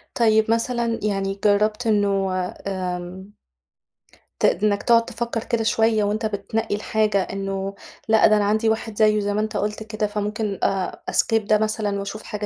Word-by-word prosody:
طيب 220 -1 +3
مثلًا 230 0 0
يعني 195 -1 -1
جرّبت 215 +3 +2
إنه 200 -3 +1 0.4
آمم 185 +1 -5 1.1
ت - - +3
إنَّك 205 -1 +2
تقعد 230 -1 +4
تفكّر 235 -1 -4
كده 230 -2 -1
شوية 220 -1 +2
وأنت 210 +2 -1
بتنقّي 215 +1 -2
الحاجة 215 -1 +1
إنه 195 0 -4 0.3
لأ، 220 0 +5
ده 215 - +4
أنا 205 - +1
عندي 215 +2 +2
واحد 220 -1 -2
زيّه 215 -1 +4
زي 205 0 -1
ما 210 - 0
أنت 215 0 -2
قلُت 210 +1 -2
كده 215 -1 -2
فممكن 210 0 -3
آآ 190 -1 -1
أskip 225 - +2
ده 215 +1 +3
مثلًا 215 -1 -1
وأشوف 200 +2 -6
حاجة 210 0 -5
210 Hz, 165 wpm, -22 LUFS, 200-220 Hz, 1.1 s, لأ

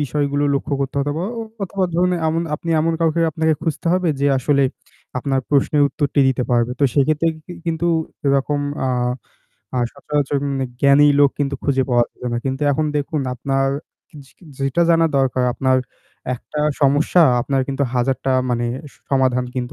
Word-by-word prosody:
বিষয়গুলো 145 0 0
লক্ষ্য 140 +1 -1
করতে 135 -1 -2
হতো, 140 +1 0
অথবা 160 +4 -3 0.4
অথবা 195 0 -1
ধরুন 180 +2 +2 0.2
এমন, 165 +1 0
আপনি 165 +2 -5
এমন 165 +1 +1
কাউকে 165 0 +2
আপনাকে 160 +1 +1
খুঁজতে 165 +1 -3
হবে 180 -1 +1
যে 140 - +2
আসলে 140 +2 +2 0.6
আপনার 135 +1 0
প্রশ্নের 145 +1 +2
উত্তরটি 145 -1 0
দিতে 130 -1 0
পারবে। 120 0 +2
তো - - +4
সেই 140 - +3
ক্ষেত্রে 155 +2 +1 0.2
কি 180 - -8
কিন্তু 165 +1 -1 0.4
এরকম 140 +1 +1 0.3
আ - - 0 0.9
আ - - +2
সচরাচর 145 -1 -1 0.4
জ্ঞানী 140 +1 +6
লোক 140 -1 +6
কিন্তু 140 -1 -1
খুঁজে 135 -2 +2
পাওয়া 120 -1 +4
যায় 125 - -4
না। 120 - 0
কিন্তু 135 +1 -2
এখন 155 +3 0
দেখুন, 145 +1 -1
আপনার 135 +2 0 0.4
কিজ 150 -5 -13
কিজ 170 - -17
যেটা 135 +4 +1
জানা 165 0 +4
দরকার, 130 -1 +1
আপনার 130 -1 +2 0.6
একটা 150 +4 -6 0.2
সমস্যা, 145 +5 +4 0.2
আপনার 135 +2 0
কিন্তু 140 +1 -1
হাজারটা 130 +1 0 0.2
মানে 120 0 0 0.4
সমাধান 130 -2 +2
কিন্তু 125 0 -3
140 Hz, 165 wpm, -20 LUFS, 135-155 Hz, 0.9 s, জ্ঞানী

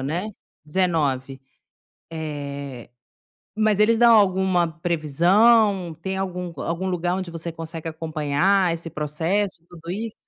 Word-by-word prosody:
né. 165 +10 -2 0.4
19. 145 -6 -1 2.2
Eh, - - -5
mas 215 -2 +2
eles 225 +2 +4
dão 235 0 +6
alguma 190 -4 +3
previsão? 180 +4 +3
Tem 190 +2 -3
algum 180 -2 -4
hã, - - -4
algum 170 +3 -2
lugar 175 -1 -1
onde 185 -2 -4
você 165 0 -5
consegue 165 0 -6 0.8
esse 165 0 -5
processo, 165 +5 -2
tudo 170 -1 -12
isso? 215 +4 -4
175 Hz, 115 wpm, -23 LUFS, 165-195 Hz, 2.2 s, dão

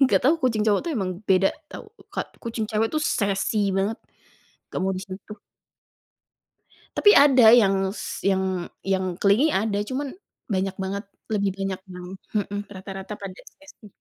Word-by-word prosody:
Enggak 270 -2 +5
tahu 290 +5 +6
kucing 225 -4 +2
cowok 205 -2 +3
itu 340 - -2
emang 190 -3 -1 0.2
beda 190 0 +5 0.2
tau, 435 - -9 0.2
Kak. - - -5
Kucing 230 -2 -3
cewek 220 +1 +1
itu, 310 - +1
sassy 200 -5 +1
banget. 200 +3 0 0.7
Gak - - -3
mau 190 - +1
disentuh. 190 +3 -8 1.6
Tapi, 415 - +7
ada 260 -5 +7
yang 195 -5 +5 0.2
s - - -5
yang 190 -2 0 0.2
yang 190 -2 0
clingy 205 - +4
ada. 205 -2 0
Cuman 270 +1 -3 0.4
banyak 190 0 0
banget, 200 +2 -3 0.3
lebih 200 -2 +1
banyak 195 -1 -3
yang 180 -1 -9 0.3
mhm, 205 -1 -1
rata-rata 195 +1 -7
pada 195 -2 -9
sassy. 290 -6 -16
200 Hz, 150 wpm, -24 LUFS, 190-225 Hz, 1.6 s, Tapi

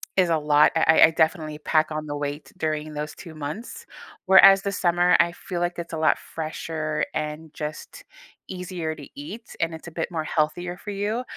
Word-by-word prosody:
is 185 -2 +3
a 165 - +3
lot, 150 0 +4
I 160 0 +5
I 160 - -3
definitely 160 -1 0
pack 155 0 +1
on 155 0 -3
the 145 -1 -4
weight 145 -1 -5
during 155 -2 -2
those 150 0 -5
2 165 -4 -11
months. 155 +11 -7 0.4
Whereas 195 0 +8
the 200 - -2
summer, 175 -2 +3
I 170 0 +3
feel 180 -1 -6
like 175 0 -1
it's 170 0 -7
a 160 - -2
lot 155 0 +3
fresher 155 -1 -4
and 155 +1 -5
just 155 - -7 0.5
easier 180 -4 -4
to 145 - -11
eat, 205 +11 -9
and 165 0 0
it's 160 - -11
a - - -8
bit 165 +2 -4
more 160 -2 -2
healthier 175 +3 -1
for 210 - -9
you. 210 +5 -2
160 Hz, 195 wpm, -24 LUFS, 155-180 Hz, 0.5 s, Whereas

